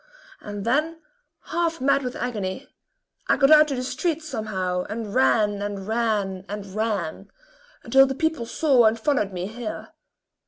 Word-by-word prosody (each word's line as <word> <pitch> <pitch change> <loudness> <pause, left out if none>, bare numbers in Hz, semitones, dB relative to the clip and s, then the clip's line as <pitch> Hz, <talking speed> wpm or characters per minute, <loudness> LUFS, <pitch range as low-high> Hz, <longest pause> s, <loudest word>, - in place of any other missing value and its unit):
And 205 -1 -6
then, 305 +7 0 0.5
half 335 -1 -1
mad 275 +2 +2
with 250 -2 -4
agony, 225 0 -4 0.6
I - - +3
got 275 +1 +4
out 305 0 +8
to 280 - -2
the 250 - -3
street, 325 +4 -2
somehow 195 -10 -2
and 215 -1 -5
ran, 210 -5 +2
and 205 -1 -4
ran, 215 -5 -1
and 205 0 -5
ran, 210 -6 -2 0.5
until 270 0 +5
the 265 - -3
people 320 -5 -1
saw 260 -2 +3
and 220 +1 +3
followed 220 -5 0
me 180 -1 -4
here. 220 +2 -6
230 Hz, 155 wpm, -24 LUFS, 205-275 Hz, 0.6 s, out